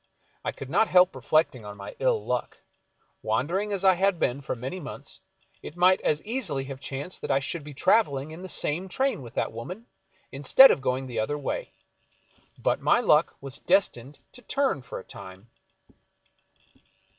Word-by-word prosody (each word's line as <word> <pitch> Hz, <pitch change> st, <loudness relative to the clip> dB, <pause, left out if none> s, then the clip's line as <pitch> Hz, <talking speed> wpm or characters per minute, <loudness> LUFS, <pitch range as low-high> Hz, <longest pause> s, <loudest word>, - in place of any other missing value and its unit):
I -, -, -2 dB
could 135 Hz, -, -9 dB
not 205 Hz, +6 st, +3 dB
help 180 Hz, 0 st, +5 dB
reflectir.j^ 155 Hz, -7 st, +1 dB
on 105 Hz, 0 st, -9 dB
my 100 Hz, -, -9 dB
ill -, -, +1 dB
luck. -, -, -3 dB, 0.6 s
Wandering 195 Hz, +7 st, -1 dB
as 195 Hz, -1 st, -1 dB
I 190 Hz, -, +7 dB
had 190 Hz, +1 st, +1 dB
been 130 Hz, +3 st, 0 dB
for 135 Hz, -, -4 dB
many 130 Hz, +10 st, -6 dB
months, 150 Hz, -, -8 dB, 0.4 s
it 155 Hz, -, -10 dB
might 185 Hz, +2 st, +4 dB
as 150 Hz, 0 st, 0 dB
easily 210 Hz, -, -1 dB
have 135 Hz, -1 st, -8 dB
chanced 140 Hz, +6 st, -5 dB
that -, -, -5 dB
I 135 Hz, -, +3 dB
should 150 Hz, +3 st, -3 dB
be 145 Hz, -1 st, -10 dB
traveling 145 Hz, -7 st, +2 dB
in 160 Hz, +3 st, -9 dB
the 185 Hz, -, -8 dB
same 175 Hz, +4 st, +1 dB
train 265 Hz, -, 0 dB
with 120 Hz, -3 st, -11 dB
that -, -, -1 dB
woman, 180 Hz, -, -8 dB, 0.5 s
instead 145 Hz, -, +7 dB
of -, -, 0 dB
going 130 Hz, 0 st, -1 dB
the 125 Hz, -3 st, -4 dB
other 130 Hz, +7 st, -1 dB
way. -, -, -4 dB, 0.9 s
But -, -, 0 dB
my -, -, +4 dB
luck 155 Hz, -9 st, +3 dB
was 135 Hz, 0 st, -4 dB
destined 150 Hz, -8 st, +1 dB
to 250 Hz, -, -13 dB
turn 265 Hz, -, 0 dB
for 125 Hz, -, -8 dB
a -, -, -8 dB
time. 95 Hz, +5 st, -12 dB
155 Hz, 180 wpm, -26 LUFS, 135-190 Hz, 0.9 s, I